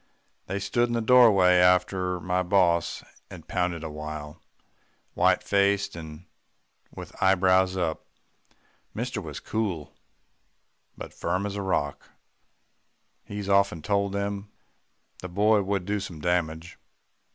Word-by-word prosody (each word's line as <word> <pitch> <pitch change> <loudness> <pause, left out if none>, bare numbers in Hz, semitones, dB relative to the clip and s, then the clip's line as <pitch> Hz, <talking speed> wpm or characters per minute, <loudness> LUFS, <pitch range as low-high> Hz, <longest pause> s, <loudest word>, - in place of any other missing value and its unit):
They 95 - -3
stood 120 +5 0
in 120 - -4
the - - +1
doorway 110 -7 +6
after 90 0 +2
my 90 +1 -1
boss 90 -2 +1 0.3
had - - -12
pounded 90 -2 -2
a 80 - -5
while 75 0 -7 0.7
white - - +2
faced, 100 -1 +1
and 80 0 -9 0.6
with - - -10
eyebrows 95 0 +3
up. 85 -3 -2 0.9
"Mister 120 0 -3
was 75 -5 -7
cool 95 -9 -3 1.0
but - - -9
firm 90 +4 -2
as 100 -1 -4
a 100 - -3
rock 75 -7 -2 1.2
he's 100 -1 -6
often 100 -5 +2
told 100 -1 0
them 100 0 -3 0.7
the 90 - -7
boy 105 +3 +3
would 100 -2 -2
do 105 +1 -1
some 90 -5 -7
damage. 85 0 -2
95 Hz, 125 wpm, -26 LUFS, 85-100 Hz, 1.2 s, doorway